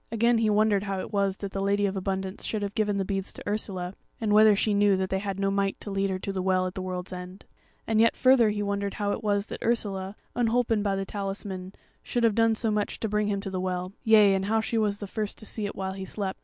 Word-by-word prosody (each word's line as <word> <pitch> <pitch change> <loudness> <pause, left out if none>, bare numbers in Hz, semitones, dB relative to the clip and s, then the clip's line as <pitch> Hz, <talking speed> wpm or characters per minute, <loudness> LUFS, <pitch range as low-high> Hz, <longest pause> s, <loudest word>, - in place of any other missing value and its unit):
Again 230 +1 +3
he 220 -1 +2
wondered 210 -1 +3
how 195 -1 -2
it 200 - -6
was 200 -1 +1
that 200 -1 -5
the 195 - -3
Lady 200 +1 +2
of 200 0 -1
Abundance 190 +1 -3
should 215 -2 -2
have 200 0 -3
given 210 -2 0
the 195 - 0
beads 195 0 -3
to - - -9
Ursula, 195 -3 -2 0.3
and 215 -2 0
whether 215 0 +7
she 210 +1 +1
knew 200 -1 +4
that 190 0 -2
they 190 - +1
had 195 -1 -4
no 195 0 +1
might 195 0 0
to 205 - -7
lead 195 0 0
her 190 - -1
to 195 +1 -4
the 190 - -2
Well 185 0 +2
at 185 - -3
the 190 - -5
World's 185 0 -5
End. 180 +1 -8 0.4
And 220 -1 +2
yet 230 - +4
further 255 -4 +5
he 205 0 -1
wondered 200 0 -2
how 205 -1 -1
it - - -3
was 205 -1 +1
that - - -8
Ursula, 200 -4 -1 0.2
unholpen 235 -2 +2
by 200 -1 0
the 195 0 -2
talisman, 195 -2 -5 0.3
should 240 - -2
have 230 -2 +4
done 225 0 +3
so 220 0 0
much 210 -1 -1
to 225 - 0
bring 210 0 0
him 200 -1 -1
to 195 - -5
the 185 -1 -2
Well; 185 0 -3
yea, 215 -3 +6
and 190 0 0
how 220 +2 +2
she 225 +1 -1
was 205 -2 +1
the 205 - -6
first 210 +1 -4
to 215 - -9
see 210 -1 -2
it - - -7
while 190 0 -3
he 190 0 -6
slept. 195 0 -4
200 Hz, 275 wpm, -27 LUFS, 190-215 Hz, 0.4 s, whether